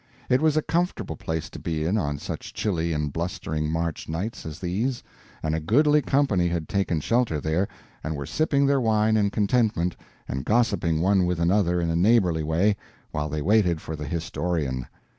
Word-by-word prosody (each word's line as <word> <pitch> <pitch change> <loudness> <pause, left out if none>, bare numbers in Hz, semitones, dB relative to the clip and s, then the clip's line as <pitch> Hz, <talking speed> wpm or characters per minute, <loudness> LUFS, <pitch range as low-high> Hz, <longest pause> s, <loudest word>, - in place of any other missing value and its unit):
It 125 - +3
was 155 -1 +3
a 155 - +2
comfortable 175 +2 -1
place 80 -1 -3
to - - -8
be 80 -2 -2
in 90 +6 +1
on 75 -9 -1
such - - -7
chilly 85 -5 0
and 75 -2 -2
blustering 80 -3 -2
March 80 -1 -2
nights 90 +5 -4
as 75 -1 -6
these, 105 +9 -2 0.4
and 80 - 0
a 80 - 0
goodly 150 - +4
company 130 -10 +2
had 85 -2 -2
taken 95 -5 0
shelter 115 -6 +1
there, 80 +6 0 0.4
and 80 +1 -2
were 70 -1 -4
sipping 140 - +1
their 140 -1 +3
wine 110 -1 +3
in 105 -2 +3
contentment 105 -4 +1 0.3
and 65 +1 -3
gossiping 100 - +1
one 95 0 +3
with 90 -1 -1
another 90 0 +2
in 85 -1 0
a - - 0
neighborly 90 -3 +3
way 85 +7 +2 0.3
while 75 +1 -2
they 75 0 -3
waited 90 -3 +3
for 80 - -6
the 75 -1 -6
historian. 80 -5 -2
90 Hz, 185 wpm, -25 LUFS, 80-110 Hz, 0.4 s, goodly